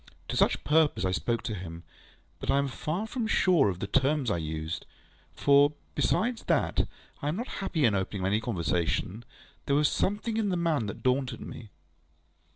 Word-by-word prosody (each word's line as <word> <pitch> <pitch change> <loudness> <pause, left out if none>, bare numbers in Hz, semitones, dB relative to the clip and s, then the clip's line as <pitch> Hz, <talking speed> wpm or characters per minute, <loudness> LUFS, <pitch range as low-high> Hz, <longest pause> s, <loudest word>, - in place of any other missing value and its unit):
To - - -2
such - - +2
purpose 150 -9 +3
I 95 - +1
spoke 115 +5 -1
to 110 - -3
him; 85 -4 -7 0.6
but - - -6
I - - +4
am 140 0 +2
far 155 +9 -3
from 230 0 -3
sure 180 - +4
of 90 - -3
the - - -2
terms 135 +2 +1
I 85 - +1
used; 80 0 -4 0.5
for, 140 +1 +5 0.2
besides 240 +1 0
that - - +1 0.3
I 145 - -2
am 150 - 0
not 240 +6 -4
happy 160 -6 +1
in 110 - +4
opening 95 0 -2
any 105 +3 +2
conversation, 90 +1 -1 0.4
there 140 - +3
was 150 +1 +4
something 210 +3 -1
in 215 -2 +1
the 180 - 0
man 160 -10 +1
that 100 - -7
daunted 130 -1 0
me. 110 - -9
135 Hz, 180 wpm, -29 LUFS, 100-160 Hz, 0.6 s, for